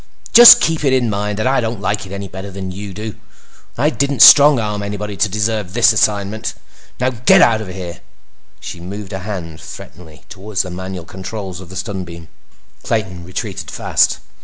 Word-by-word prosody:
"Just 240 Hz, 0 st, +10 dB
keep 160 Hz, -2 st, -1 dB
it 135 Hz, -2 st, +2 dB
in 125 Hz, -4 st, +1 dB
mind 105 Hz, 0 st, -3 dB
that 110 Hz, -, -2 dB
I 135 Hz, 0 st, +1 dB
don't 115 Hz, -2 st, -4 dB
like 105 Hz, 0 st, -3 dB
it -, -, -13 dB
any 100 Hz, 0 st, -6 dB
better 95 Hz, +2 st, -9 dB
than 95 Hz, -1 st, -7 dB
you 100 Hz, +2 st, -8 dB
do—and 105 Hz, +3 st, -7 dB, 0.6 s
I 150 Hz, +5 st, +1 dB
didn't 140 Hz, -5 st, +2 dB
strong 145 Hz, 0 st, +8 dB
arm 105 Hz, -2 st, -3 dB
anybody 105 Hz, 0 st, -5 dB
to 105 Hz, -, +1 dB
deserve 105 Hz, -1 st, -3 dB
the 120 Hz, -, -2 dB
assignment! 110 Hz, -2 st, +1 dB, 0.4 s
Now 130 Hz, +1 st, 0 dB
get 120 Hz, 0 st, +3 dB
out 110 Hz, -2 st, +2 dB
of 110 Hz, -, -7 dB
here!" 90 Hz, -2 st, -8 dB, 0.6 s
She 90 Hz, -, -9 dB
moved 95 Hz, +3 st, -8 dB
a 95 Hz, -, -4 dB
hand 90 Hz, -6 st, -7 dB
threateningly 80 Hz, -2 st, -13 dB
toward 100 Hz, +1 st, -10 dB
the 90 Hz, -1 st, 0 dB
manual 95 Hz, -1 st, -7 dB
controls 95 Hz, 0 st, -8 dB
of 90 Hz, -, -13 dB
the 95 Hz, -, -11 dB
stun 95 Hz, 0 st, -5 dB
beam. 85 Hz, -2 st, -12 dB, 0.5 s
Clayton 95 Hz, -6 st, -3 dB
retreated 95 Hz, +3 st, -6 dB
fast. -, -, +1 dB
100 Hz, 185 wpm, -17 LUFS, 95-110 Hz, 0.6 s, Just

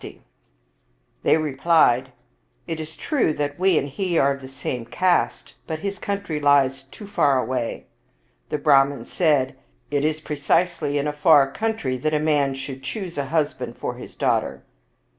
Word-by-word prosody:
52 -, -, -7 dB
Visakha -, -, -29 dB, 1.0 s
They -, -, +4 dB
replied, 135 Hz, -4 st, +2 dB, 0.3 s
" -, -, -43 dB
It 160 Hz, -, -3 dB
is 160 Hz, 0 st, -5 dB
true 280 Hz, -, 0 dB
that 145 Hz, +1 st, -3 dB
we 185 Hz, -3 st, +4 dB
and 140 Hz, -, 0 dB
he 175 Hz, +4 st, -2 dB
are 140 Hz, -1 st, +4 dB
of 140 Hz, -, -10 dB
the 130 Hz, -, -9 dB
same 130 Hz, -2 st, -4 dB
caste, 175 Hz, +10 st, 0 dB
but 160 Hz, -, -3 dB
his 200 Hz, +3 st, -4 dB
country 200 Hz, -6 st, -3 dB
lies 135 Hz, -2 st, +3 dB
too 205 Hz, +10 st, -12 dB
far 145 Hz, -10 st, +2 dB
away." 125 Hz, -1 st, -3 dB, 0.6 s
The -, -, -1 dB
Brahman 140 Hz, -1 st, +3 dB
said, 150 Hz, -7 st, +1 dB, 0.2 s
" -, -, -39 dB
It 145 Hz, -1 st, +1 dB
is 155 Hz, 0 st, 0 dB
precisely 150 Hz, 0 st, 0 dB
in 145 Hz, -, 0 dB
a 150 Hz, -, -1 dB
far 150 Hz, -1 st, +6 dB
away 135 Hz, -, -11 dB
country 220 Hz, -13 st, -2 dB
that 155 Hz, +4 st, -1 dB
a -, -, +2 dB
man 145 Hz, -3 st, +1 dB
should 135 Hz, 0 st, -7 dB
choose 180 Hz, +4 st, -5 dB
a 140 Hz, -, -1 dB
husband 135 Hz, -5 st, -2 dB
for -, -, -3 dB
his 125 Hz, -, -11 dB
daughter." -, -, 0 dB
145 Hz, 180 wpm, -23 LUFS, 135-165 Hz, 1.0 s, far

